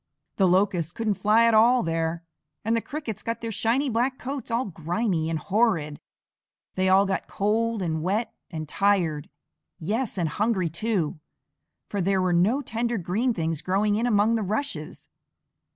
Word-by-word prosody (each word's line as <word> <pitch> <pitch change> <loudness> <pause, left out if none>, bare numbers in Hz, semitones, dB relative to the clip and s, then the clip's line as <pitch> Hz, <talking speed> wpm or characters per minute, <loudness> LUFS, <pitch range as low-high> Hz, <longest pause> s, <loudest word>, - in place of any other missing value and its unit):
The 190 - +4
Locusts 180 -3 +2
couldn't 220 +2 -1
fly 215 +2 +5
at 230 - +4
all 235 +3 +5
there, 165 0 -2 0.4
and 225 +1 +2
the 230 - +1
Crickets 275 -8 -6
got 230 0 -4
their 230 -1 -3
shiny 235 +7 +1
black 255 +2 0
coats 270 0 -5
all 235 +2 0
grimy 170 0 -1
and 165 - -1
horrid. 165 -6 0 0.7
They 185 0 +1
all 195 +1 +5
got 190 -1 -2
cold 220 +1 0
and 160 -2 -1
wet 205 +7 -1 0.2
and 155 -2 -5
tired 170 -5 +1 0.5
yes, 210 +7 -2
and 170 -3 +1
hungry 190 -1 0
too, 170 -4 -1 0.7
for 200 - -2
there 190 +1 +1
were 185 -1 +1
no 215 +12 +2
tender 235 0 -2
green 205 +8 0
things 165 -6 -2
growing 200 +4 +1
in 225 +4 +1
among 215 0 +3
the 225 - +1
rushes. 220 +8 -4
205 Hz, 165 wpm, -25 LUFS, 175-230 Hz, 0.7 s, fly